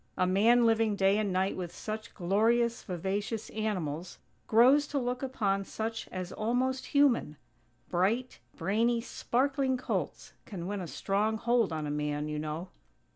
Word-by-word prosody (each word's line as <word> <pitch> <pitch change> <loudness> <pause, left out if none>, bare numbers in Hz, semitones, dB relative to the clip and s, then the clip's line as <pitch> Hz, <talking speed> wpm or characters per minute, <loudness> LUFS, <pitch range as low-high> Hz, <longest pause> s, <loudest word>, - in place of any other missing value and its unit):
A 185 - +3
man 225 +6 +4
living 225 -2 +3
day 195 +1 +3
and 205 -2 0
night 185 +1 0
with 175 -2 -6
such 215 0 -6
glorious, 225 +6 +2
vivacious 200 +4 -3
animals, 180 -6 -3 0.3
grows 260 +6 +5
to 290 - -3
look 250 -1 -1
upon 205 -7 0
such 225 +3 -4
as 185 -1 -6
almost 255 +4 -1
human. 260 - +2 0.5
Bright, 215 +8 0 0.2
brainy, 230 +4 +1
sparkling 265 +2 0
colts 255 - -3
can 180 -5 -6
win 200 +1 -3
a 175 - -5
strong 210 +6 0
hold 235 -3 +2
on 155 -1 -3
a 145 - -3
man, 150 0 -2
you 150 0 -3
know. 155 +4 -4
215 Hz, 150 wpm, -30 LUFS, 185-240 Hz, 0.5 s, grows